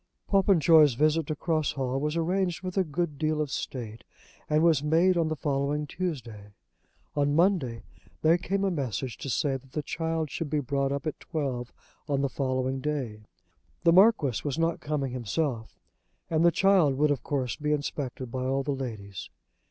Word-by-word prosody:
Popenjoy's 165 Hz, -, +5 dB
visit 155 Hz, +3 st, +2 dB
to 155 Hz, -, -2 dB
Cross 155 Hz, -1 st, 0 dB
Hall 130 Hz, 0 st, -2 dB
was 150 Hz, +3 st, -1 dB
arranged 180 Hz, +1 st, 0 dB
with 185 Hz, -1 st, -4 dB
a 190 Hz, -, +3 dB
good 155 Hz, -2 st, -3 dB
deal 155 Hz, -1 st, 0 dB
of 150 Hz, -3 st, -1 dB
state, 115 Hz, -3 st, -5 dB, 0.5 s
and 155 Hz, +1 st, +3 dB
was 165 Hz, -5 st, +4 dB
made 165 Hz, +5 st, +3 dB
on 165 Hz, -2 st, +2 dB
the 155 Hz, -, -1 dB
following 145 Hz, +1 st, -1 dB
Tuesday. 120 Hz, -, -5 dB, 0.6 s
On 145 Hz, -1 st, +2 dB
the 145 Hz, -, +1 dB
Monday 165 Hz, -, +2 dB, 0.4 s
there 165 Hz, +2 st, +5 dB
came 195 Hz, +3 st, -1 dB
a 195 Hz, -, +1 dB
message 130 Hz, -, -3 dB
to 140 Hz, -, -5 dB
say 135 Hz, +1 st, 0 dB
that 135 Hz, 0 st, -20 dB
the 150 Hz, -, -2 dB
child 160 Hz, -1 st, -2 dB
should 165 Hz, -3 st, -4 dB
be 150 Hz, 0 st, +1 dB
brought 140 Hz, 0 st, -1 dB
up 140 Hz, +1 st, -3 dB
at 155 Hz, -, -3 dB
twelve 130 Hz, -6 st, -3 dB, 0.4 s
on 140 Hz, -1 st, +1 dB
the 140 Hz, -, 0 dB
following 130 Hz, -1 st, -1 dB
day. 130 Hz, -8 st, -3 dB, 0.6 s
The 170 Hz, -, +5 dB
Marquis 185 Hz, -, +4 dB
was 145 Hz, 0 st, -2 dB
not 165 Hz, 0 st, 0 dB
coming 145 Hz, -3 st, -2 dB
himself, 125 Hz, 0 st, -3 dB, 0.5 s
and 160 Hz, 0 st, +2 dB
the 170 Hz, -, +7 dB
child 180 Hz, -6 st, +3 dB
would 150 Hz, +2 st, +2 dB
of 140 Hz, -, -1 dB
course 130 Hz, -4 st, -2 dB
be 150 Hz, 0 st, -2 dB
inspected 140 Hz, -4 st, -3 dB
by 130 Hz, 0 st, -3 dB
all 135 Hz, +1 st, 0 dB
the 145 Hz, -, -2 dB
ladies. 110 Hz, -8 st, -6 dB
145 Hz, 185 wpm, -28 LUFS, 130-165 Hz, 0.6 s, the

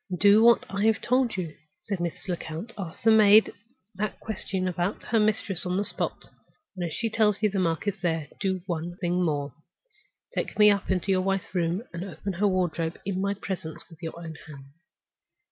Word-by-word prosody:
"Do 205 Hz, +2 st, +7 dB
what 235 Hz, -1 st, +6 dB
I 200 Hz, +3 st, +2 dB
told 250 Hz, 0 st, +1 dB
you," 170 Hz, -4 st, -4 dB, 0.2 s
said 200 Hz, -3 st, -4 dB
Mrs. 170 Hz, +2 st, -4 dB
Lecount. 175 Hz, +4 st, -5 dB
"Ask 180 Hz, -6 st, -7 dB
the 225 Hz, -, +6 dB
maid 215 Hz, 0 st, +7 dB, 0.4 s
that 205 Hz, +2 st, -3 dB
question 190 Hz, -3 st, -3 dB
about 180 Hz, +2 st, -2 dB
her 225 Hz, -, +1 dB
mistress 210 Hz, -3 st, +1 dB
on 180 Hz, 0 st, -1 dB
the 205 Hz, -, 0 dB
spot. -, -, -3 dB, 0.5 s
And 180 Hz, -, -4 dB
if -, -, -7 dB
she 230 Hz, -, 0 dB
tells 215 Hz, -2 st, +2 dB
you 210 Hz, -, +3 dB
the 195 Hz, -, -1 dB
mark 165 Hz, +1 st, 0 dB
is 200 Hz, 0 st, -2 dB
there, 165 Hz, -4 st, 0 dB
do 190 Hz, -2 st, -1 dB
one 175 Hz, -1 st, -4 dB
thing 180 Hz, 0 st, 0 dB
more. 145 Hz, -4 st, -1 dB, 0.8 s
Take -, -, -2 dB
me 210 Hz, -1 st, +8 dB
up 200 Hz, -1 st, -1 dB
into 190 Hz, +1 st, +1 dB
your 185 Hz, -1 st, +3 dB
wife's 195 Hz, 0 st, -1 dB
room, 175 Hz, +3 st, 0 dB
and 170 Hz, +1 st, -4 dB
open 195 Hz, 0 st, -5 dB
her 200 Hz, +4 st, +2 dB
wardrobe 175 Hz, -3 st, 0 dB
in 190 Hz, -1 st, -1 dB
my 200 Hz, +1 st, 0 dB
presence 180 Hz, -6 st, -5 dB
with 165 Hz, +1 st, -15 dB
your 165 Hz, -1 st, -5 dB
own 165 Hz, -2 st, -7 dB
hands." 140 Hz, -2 st, -12 dB
190 Hz, 195 wpm, -27 LUFS, 170-205 Hz, 0.8 s, me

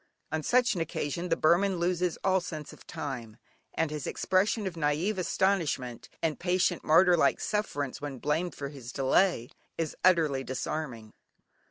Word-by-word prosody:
On 155 Hz, -, -1 dB
such 245 Hz, +8 st, +3 dB
an 175 Hz, -, -2 dB
occasion 165 Hz, +2 st, -3 dB
the 165 Hz, -, +2 dB
Burman 180 Hz, +4 st, +3 dB
loses 175 Hz, 0 st, 0 dB
all 190 Hz, -1 st, +3 dB
sense 155 Hz, -4 st, -7 dB
of -, -, -16 dB
time, 125 Hz, -9 st, -6 dB, 0.4 s
and 160 Hz, -2 st, 0 dB
his 150 Hz, -3 st, -4 dB
expression 200 Hz, +3 st, +1 dB
of 185 Hz, -3 st, -3 dB
naive 165 Hz, +6 st, 0 dB
astonishment, 165 Hz, -10 st, 0 dB
and 160 Hz, -2 st, 0 dB
patient 180 Hz, -1 st, +1 dB
martyr 180 Hz, +3 st, +6 dB
like 170 Hz, -, +3 dB
sufferance, 145 Hz, -12 st, -2 dB
when 145 Hz, -2 st, -5 dB
blamed 155 Hz, +7 st, -1 dB
for 140 Hz, -1 st, -5 dB
his 130 Hz, -4 st, -9 dB
delay, 135 Hz, 0 st, +2 dB, 0.3 s
is 160 Hz, -2 st, -2 dB
utterly 160 Hz, -7 st, +3 dB
disarming. 130 Hz, -4 st, -4 dB
165 Hz, 155 wpm, -29 LUFS, 145-180 Hz, 0.4 s, martyr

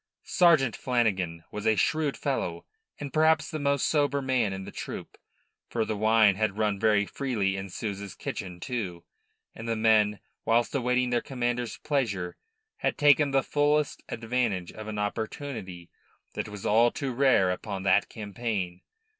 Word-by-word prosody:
Sergeant 165 Hz, -, +4 dB
Flanagan 95 Hz, -10 st, 0 dB
was 105 Hz, 0 st, -3 dB
a 110 Hz, -, +4 dB
shrewd 150 Hz, +7 st, +1 dB
fellow -, -, -2 dB, 0.3 s
and 145 Hz, -2 st, -6 dB
perhaps 160 Hz, 0 st, +3 dB
the 155 Hz, -, -3 dB
most 140 Hz, -1 st, +1 dB
sober 145 Hz, -2 st, +2 dB
man 130 Hz, -6 st, +1 dB
in 95 Hz, 0 st, -5 dB
the -, -, -8 dB
troop -, -, -7 dB, 0.5 s
for 115 Hz, -2 st, 0 dB
the 110 Hz, -, -2 dB
wine 110 Hz, 0 st, +5 dB
had 105 Hz, -2 st, 0 dB
run 105 Hz, -2 st, 0 dB
very 105 Hz, -1 st, +3 dB
freely 105 Hz, -7 st, -1 dB
in 95 Hz, 0 st, -5 dB
Souza's 100 Hz, -1 st, -5 dB
kitchen, 90 Hz, -2 st, -6 dB
too, 95 Hz, -8 st, -4 dB, 0.5 s
and 115 Hz, -, -8 dB
the 115 Hz, -, +1 dB
men, 110 Hz, -2 st, +3 dB, 0.2 s
whilst 115 Hz, +1 st, +2 dB
awaiting 125 Hz, -1 st, +1 dB
their 120 Hz, -1 st, +2 dB
commander's 120 Hz, -2 st, -2 dB
pleasure, 100 Hz, -12 st, -1 dB, 0.4 s
had -, -, -1 dB
taken 145 Hz, -1 st, +5 dB
the 135 Hz, -1 st, +2 dB
fullest 150 Hz, 0 st, +1 dB
advantage 115 Hz, -6 st, -1 dB
of 110 Hz, 0 st, -9 dB
an 110 Hz, -1 st, -4 dB
opportunity 105 Hz, -4 st, -4 dB, 0.4 s
that -, -, -4 dB
was 105 Hz, -2 st, -8 dB
all 115 Hz, +3 st, +5 dB
too 135 Hz, 0 st, -4 dB
rare 120 Hz, -8 st, +4 dB
upon 95 Hz, +1 st, -4 dB
that 95 Hz, -1 st, +3 dB
campaign. 100 Hz, -4 st, -4 dB
115 Hz, 155 wpm, -28 LUFS, 100-135 Hz, 0.5 s, wine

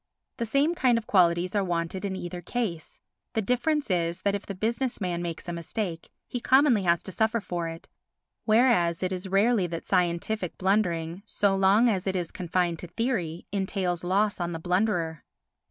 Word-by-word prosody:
The 235 Hz, -, -2 dB
same 280 Hz, +8 st, +2 dB
kind 255 Hz, -8 st, +3 dB
of 230 Hz, -, -4 dB
qualities 175 Hz, 0 st, +3 dB
are 205 Hz, -2 st, +2 dB
wanted 175 Hz, +1 st, -2 dB
in 190 Hz, -1 st, -2 dB
either 175 Hz, -1 st, -6 dB
case. 185 Hz, -8 st, -4 dB, 0.4 s
The 220 Hz, -, +1 dB
difference 250 Hz, +4 st, 0 dB
is 170 Hz, 0 st, 0 dB
that 200 Hz, -, +2 dB
if 200 Hz, -, -4 dB
the 200 Hz, -, -5 dB
business 235 Hz, +6 st, -1 dB
man 175 Hz, -4 st, -2 dB
makes 170 Hz, 0 st, -5 dB
a 175 Hz, -, -3 dB
mistake, 170 Hz, 0 st, -4 dB, 0.2 s
he 245 Hz, -, -4 dB
commonly 260 Hz, -3 st, +4 dB
has 170 Hz, -2 st, +2 dB
to -, -, -7 dB
suffer 220 Hz, +4 st, +1 dB
for 175 Hz, -4 st, -3 dB
it, 165 Hz, 0 st, -8 dB, 0.6 s
whereas 215 Hz, -7 st, +3 dB
it 185 Hz, +1 st, 0 dB
is 185 Hz, +1 st, -5 dB
rarely 200 Hz, 0 st, +3 dB
that 165 Hz, -1 st, -6 dB
scientific 180 Hz, +1 st, 0 dB
blundering, 180 Hz, -3 st, 0 dB
so 200 Hz, -1 st, +2 dB
long 195 Hz, +5 st, +4 dB
as 195 Hz, -4 st, 0 dB
it 190 Hz, -, 0 dB
is 175 Hz, -2 st, -2 dB
confined 175 Hz, -2 st, -1 dB
to 175 Hz, -, -7 dB
theory, 180 Hz, -6 st, -2 dB
entails 190 Hz, -3 st, -1 dB
loss 200 Hz, +4 st, +1 dB
on 175 Hz, -1 st, -2 dB
the 165 Hz, -, -4 dB
blunderer. 175 Hz, -3 st, 0 dB
190 Hz, 185 wpm, -27 LUFS, 170-220 Hz, 0.6 s, commonly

